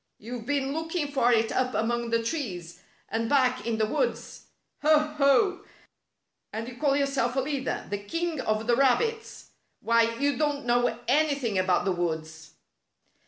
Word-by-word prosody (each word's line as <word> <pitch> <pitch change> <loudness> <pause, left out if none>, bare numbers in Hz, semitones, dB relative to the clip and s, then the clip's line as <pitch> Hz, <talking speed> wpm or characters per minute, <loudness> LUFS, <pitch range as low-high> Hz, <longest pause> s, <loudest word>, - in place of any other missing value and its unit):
You've 230 +1 -8
been 275 -1 0
looking 320 -1 -3
for 255 -3 +3
it 225 -1 +2
up 255 -1 0
among 235 +1 -1
the 230 0 +1
trees, 195 - -4 0.3
and 225 +1 -2
back 255 -3 +2
in 230 -1 0
the 220 - +2
woods. 480 - -3 0.3
Ho! 310 +1 +5 0.2
Ho! 280 +8 +3 0.9
And 225 +1 -5
you 245 -1 -9
call 280 0 +2
yourself 275 -3 0
a - - +2
leader 275 0 -2
— - - -16
the 205 - -1
king 330 +7 -3
of 215 -1 -1
the 240 +1 +3
rabbits 445 - 0 0.3
1 230 - 0
Why, 230 - -4
you 280 +1 0
don't 290 -2 0
know 245 -1 +2
anything 275 -7 +1
about 185 -1 +1
the 195 - +1
woods." 160 -2 -4
245 Hz, 165 wpm, -27 LUFS, 225-285 Hz, 0.9 s, Ho